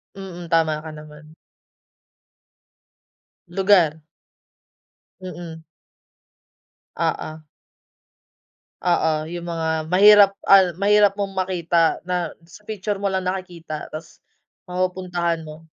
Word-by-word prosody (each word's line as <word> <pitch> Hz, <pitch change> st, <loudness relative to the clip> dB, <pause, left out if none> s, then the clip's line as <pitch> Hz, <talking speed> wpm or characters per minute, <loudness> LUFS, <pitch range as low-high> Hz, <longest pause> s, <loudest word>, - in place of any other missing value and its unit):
Mm, 180 Hz, -3 st, -8 dB
tama 160 Hz, -2 st, +1 dB
ka 155 Hz, 0 st, -9 dB
naman. 150 Hz, 0 st, -14 dB, 2.1 s
Lugar. 175 Hz, -4 st, +3 dB, 1.2 s
Mm. 170 Hz, -3 st, -9 dB, 1.4 s
Oo. 155 Hz, 0 st, -3 dB, 1.4 s
Oo, 160 Hz, -3 st, +1 dB
yung 175 Hz, 0 st, -6 dB
mga 160 Hz, -2 st, -2 dB
mahirap, 200 Hz, +3 st, +7 dB
ah, 190 Hz, -4 st, +5 dB
mahirap 205 Hz, +1 st, +4 dB
mong 200 Hz, -1 st, -3 dB
makita 175 Hz, -3 st, 0 dB
na 180 Hz, 0 st, -3 dB
sa 170 Hz, +5 st, -16 dB
picture 205 Hz, -1 st, -3 dB
mo 200 Hz, -, -1 dB
lang 190 Hz, -1 st, -1 dB
nakikita 180 Hz, -4 st, -5 dB
tas 155 Hz, +1 st, -10 dB, 0.5 s
mapupuntahan 180 Hz, -2 st, -2 dB
mo. 155 Hz, +1 st, -11 dB
175 Hz, 90 wpm, -22 LUFS, 160-190 Hz, 2.1 s, mahirap